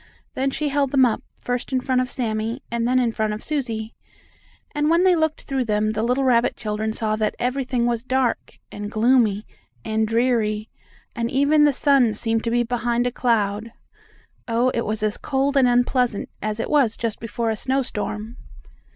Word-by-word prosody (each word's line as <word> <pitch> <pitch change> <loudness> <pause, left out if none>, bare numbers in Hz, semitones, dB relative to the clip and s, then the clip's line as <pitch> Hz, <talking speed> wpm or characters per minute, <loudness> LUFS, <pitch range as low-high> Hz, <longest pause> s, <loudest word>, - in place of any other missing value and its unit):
Then 270 +1 0
she 295 +2 -2
held 280 -1 +1
them 265 -1 +4
up, 230 - 0 0.2
first 245 +1 -3
in 260 - +2
front 255 0 +1
of 255 - -3
Sammie, 225 +1 -2
and 235 0 0
then 255 +1 +2
in 245 -2 +2
front 215 -1 -1
of 210 - -6
Susie. 230 -7 -3 0.8
And 295 0 +1
when 335 +2 +4
they 370 -1 +5
looked 315 -1 0
through 265 -2 -2
them 215 0 +1
the 215 0 -2
little 250 +4 +1
rabbit 245 -2 +3
children 215 0 -2
saw 215 -1 -1
that 215 -1 -1
everything 250 -1 -1
was 235 -1 -1
dark, 255 -1 -1
and 205 0 -6
gloomy, 220 -2 +2 0.4
and 220 0 0
dreary, 225 -2 0 0.5
and 235 0 -1
even 285 +3 +4
the 295 - +5
sun 270 -5 +3
seemed 225 +1 -1
to - - +1
be 240 +1 +2
behind 240 0 0
a 245 - 0
cloud. 225 -2 0 0.7
Oh, 235 +2 +2
it 235 -2 -2
was 215 0 -2
as 210 -1 0
cold 275 +1 -1
and 265 -2 +5
unpleasant 245 -2 +1
as 215 +1 -3
it - - -2
is 255 -7 +3
just 230 -2 -3
before 230 0 -2
a - - -1
snowstorm. 230 -3 -2
240 Hz, 185 wpm, -22 LUFS, 220-260 Hz, 0.8 s, they